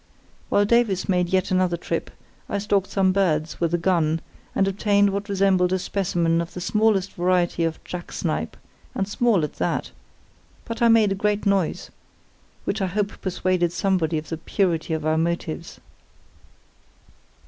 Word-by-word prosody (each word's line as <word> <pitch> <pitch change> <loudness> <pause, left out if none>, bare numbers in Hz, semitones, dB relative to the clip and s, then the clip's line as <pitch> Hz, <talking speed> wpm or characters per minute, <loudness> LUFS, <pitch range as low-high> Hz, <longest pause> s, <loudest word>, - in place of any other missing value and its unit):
While 205 - +3
Davies 215 -4 +2
made 180 -2 +1
yet 190 +1 +1
another 185 -2 +2
trip, - - -3 0.4
I - - -1
stalked 200 -1 0
some 190 -1 +2
birds 165 -5 0
with 170 -1 +1
a 175 - +2
gun, 165 -3 +1 0.4
and 195 - +2
obtained 200 +1 +2
what 200 +1 -4
resembled 190 -2 +2
a 185 - +2
specimen 175 -3 0
of 170 - -7
the - - -4
smallest 210 0 +1
variety 175 -1 +1
of 160 -1 -2
jack 175 -1 -7
snipe, - - -3 0.4
and 195 - -1
small 210 -4 +2
at 150 - -4
that; - - -1 0.7
but 230 0 -6
I 235 - +6
made 225 -3 +5
a - - +3
great 210 +2 0
noise, 195 -4 0 0.7
which 205 +1 -2
I 190 - +1
hope 205 +3 -3
persuaded 185 -2 0
somebody 175 -4 0
of 155 - -6
the 165 - -3
purity 165 -2 0
of 155 -1 -4
our 155 0 +2
motives. 170 0 -3
185 Hz, 160 wpm, -23 LUFS, 170-200 Hz, 0.7 s, I